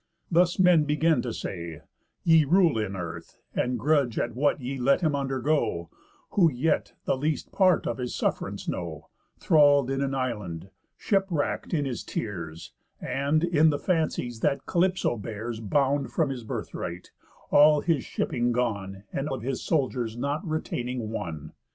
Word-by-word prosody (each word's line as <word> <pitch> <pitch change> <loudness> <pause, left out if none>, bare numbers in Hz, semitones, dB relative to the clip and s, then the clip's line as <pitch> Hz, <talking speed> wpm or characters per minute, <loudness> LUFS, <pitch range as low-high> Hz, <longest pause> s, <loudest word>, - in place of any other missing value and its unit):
Thus 175 +1 +3
men 180 -5 +5
begin 150 +2 +2
to 120 - -3
say, 85 -7 -6 0.4
ye 165 -2 +6
rule 165 -4 +3
in 100 -2 -2
earth, 85 -2 -7 0.2
And 125 0 0
grudge 140 -1 +1
at 120 - -1
what 145 +4 +1
ye 135 +1 -4
let 140 +7 +3
him 155 -4 +1
undergo, 135 - -1 0.4
Who 170 -5 +4
yet 145 +5 0
the - - +2
least 150 +1 -2
part 185 -2 +3
of 120 - -2
his 125 -1 -3
suff'rance - - -2
know: - - -5 0.3
Thrall'd 145 -4 +4
in 135 0 -1
an 135 -1 -1
island, 105 -9 -4 0.3
shipwrack'd 195 -7 0
in 150 -4 +1
his 125 -4 -4
tears, 85 - -5 0.3
And, 145 +4 0
in 160 -2 +4
the 145 - +1
fancies 155 - -1
that 140 - 0
Calypso 180 -7 +1
bears, 110 +2 -5
Bound 135 +5 +1
from 155 -4 +1
his 125 -4 -6
birthright, 90 -4 -5 0.4
all 150 0 +6
his 165 -6 +1
shipping 120 0 -1
gone, 100 -5 -2
And 140 +2 -2
of 130 -5 -4
his 130 +1 -2
soldiers 125 -7 -1
not 140 +6 -2
retaining 125 - -3
one. 80 -7 -5
135 Hz, 155 wpm, -27 LUFS, 115-155 Hz, 0.4 s, ye